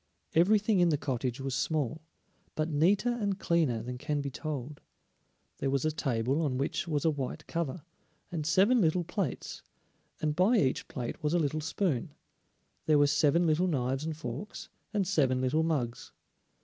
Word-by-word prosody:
Everything 205 +4 +4
in 175 -1 +5
the 150 - +2
cottage 130 -2 -2
was 135 -1 -3
small, 155 +1 -1 0.5
but 155 +1 -1
neater 190 +11 +3
and 200 -3 -1
cleaner 155 - +1
than 125 +1 -6
can 145 +2 -1
be 140 -1 -3
told. 145 -1 -5 0.8
There 135 - 0
was 140 +2 0
a 155 - +2
table 135 -1 0
on 140 -5 0
which 140 +5 -2
was 150 -2 -1
a 160 - +4
white 145 +2 -4
cover, 165 -1 -3 0.5
and 165 -3 -2
seven 200 +10 +4
little 175 +1 +2
plates, 190 +2 -4 0.6
and 150 -1 -1
by 200 +8 +4
each 130 -10 +1
plate 125 +3 -5
was 150 +2 +1
a - - +3
little 155 0 0
spoon; 160 - -1 0.7
there 155 -1 +5
were 145 - +5
seven 145 +4 +3
little 165 +3 +2
knives 135 -3 -1
and 160 -1 -4
forks, 150 - -6 0.2
and 205 -4 0
seven 135 -9 +2
little 130 +5 +1
mugs. 140 -8 -2
155 Hz, 170 wpm, -30 LUFS, 135-170 Hz, 0.8 s, in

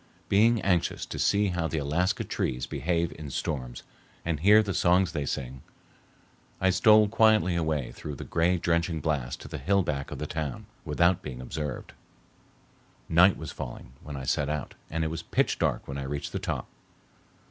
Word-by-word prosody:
Being 115 +3 +4
anxious 90 -4 +1
to - - -6
see 100 0 +3
how 90 -2 -1
the 80 - -3
Alaska 85 +8 0
trees 60 -1 -2
behave 85 -1 -1
in 75 -2 -6
storms 65 -3 -4 0.4
and 80 -3 -1
hear 105 +6 +6
the 100 -2 -3
songs 90 0 +3
they 75 -5 -3
sing, 65 -1 -4 1.0
I 95 0 +3
stole 105 +3 +6
quietly 110 -5 +4
away 80 -6 -1
through 75 -2 -7
the - - -7
gray 85 +2 +1
drenching 85 -1 0
blast 70 -5 -2
to - - -9
the - - -6
hill 100 +1 +2
back 70 -4 -3
of - - -6
the 75 - -4
town, 75 -4 -4 0.2
without 85 +1 +2
being 65 -1 -7
observed. 70 +1 -5 1.2
Night 90 +4 +6
was 80 - -6
falling - - -8
when 75 -2 -7
I 65 - -6
set 70 +2 0
out 75 -1 -3 0.2
and 80 +1 -1
it 80 - -1
was 80 0 -4
pitch - - 0
dark - - 0
when 70 0 -5
I - - -4
reached 70 +1 -4
the - - -3
top. - - -3
80 Hz, 180 wpm, -28 LUFS, 70-90 Hz, 1.2 s, hear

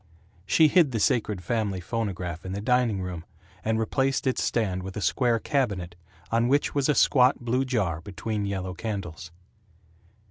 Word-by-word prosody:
She 160 +7 +5
hid 155 0 +4
the 115 - 0
sacred 105 -3 +1
family 105 -1 -1
phonograph 90 -4 -4
in 95 - -5
the 100 - -3
dining 120 -3 +1
room, 90 -3 -5 0.4
and 110 0 +1
replaced 135 +6 0
its 130 - +1
stand 95 -6 0
with 95 +2 -7
a - - -1
square 120 +2 +2
cabinet 100 -10 -1 0.4
on 115 +1 +2
which 140 +3 +2
was 140 0 +1
a 150 - +3
squat 130 -1 +4
blue 125 +3 0
jar 100 - -1
between 100 +3 -4
yellow 95 -2 -3
candles. 90 -5 -5
110 Hz, 165 wpm, -26 LUFS, 95-125 Hz, 0.4 s, She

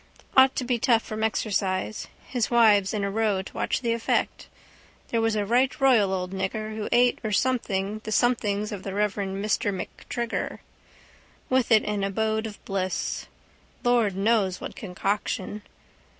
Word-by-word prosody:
Ought 265 0 +6
to - - -1
be 245 -1 0
tough 230 -2 +3
from 215 0 -4
exercise. 205 -2 -1 0.2
His 245 -4 -1
wives 215 -5 +5
in 210 -2 -2
a 200 - -1
row 210 -3 +1
to - - -12
watch - - -1
the 235 -2 +1
effect. 230 -1 -1 0.6
There 230 - +1
was 225 -1 +1
a 205 -1 0
right 250 +7 +2
royal 240 -8 +4
old 180 -1 -2
nigger. 215 +3 -3
Who 215 -1 -4
ate 245 0 +4
or 215 - -2
something 215 -3 0
the 215 - -5
somethings 215 -3 +1
of 205 -3 -5
the 195 0 -5
reverend 200 -1 -1
Mr 205 -1 +1
MacTrigger. 230 +4 -4 0.9
With 255 -2 +2
it 220 -1 +6
an 205 -1 -2
abode 220 +2 0
of 210 - -12
bliss. 190 -2 -2 0.6
Lord 235 -5 +2
knows 200 -3 +2
what - - -7
concoction. 200 +1 -3
215 Hz, 160 wpm, -26 LUFS, 195-230 Hz, 0.9 s, Ought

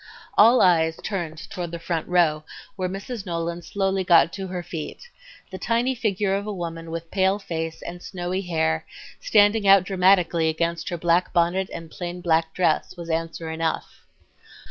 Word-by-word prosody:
All 230 +4 +6
eyes 160 -3 +3
turned 165 -6 -4
toward 175 -3 -4
the 170 - -5
front 165 -1 -3
row, 165 -4 +2 0.3
where 185 -2 -2
Mrs. 195 +4 -6
Nolan 170 -1 -3
slowly 195 0 -1
got 170 -2 +5
to 195 -1 -5
her 180 -1 -5
feet. 170 - -7 0.4
The 190 - -7
tiny 235 +6 +1
figure 205 -5 0
of 200 +1 -2
a - - -2
woman 165 -3 -5
with 165 0 -6
pale 190 0 +2
face 165 -4 -5
and 175 +1 -7
snowy 185 0 -3
hair, 160 - 0 0.4
standing 205 0 +3
out 195 -1 +7
dramatically 180 -3 +3
against 170 +3 -2
her 175 - -3
black 170 +2 +1
bonnet 175 +2 +1
and 165 -1 -8
plain 175 0 -6
black 165 -2 +1
dress, 180 0 0
was 170 -1 -5
answer 165 0 -3
enough. 160 0 -3
175 Hz, 165 wpm, -24 LUFS, 165-195 Hz, 0.4 s, out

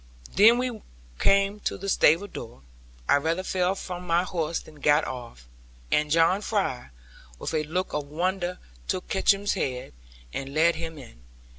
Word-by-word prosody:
When 225 +4 +7
we 245 -3 -2 0.4
came 200 +1 +3
to - - -2
the 195 - -6
stable 175 -1 +4
door, 120 - -9 0.4
I - - +5
rather 165 +5 -1
fell 185 0 0
from 180 -2 -6
my 170 +1 +3
horse 165 -3 -2
than 155 -1 -15
got 145 +2 +4
off; 120 - -8 0.4
and 150 0 +2
John 165 +5 +4
Fry, 195 - -1 0.5
with - - -5
a 155 - +2
look 180 +5 -2
of 150 -1 -2
wonder 180 +3 -1 0.3
took 185 - -2
Kickum's 200 +1 +2
head, 130 -8 -3 0.4
and 140 +1 -5
led 165 +2 +5
him 160 -1 -6
in. 120 - -13
170 Hz, 160 wpm, -26 LUFS, 150-190 Hz, 0.5 s, When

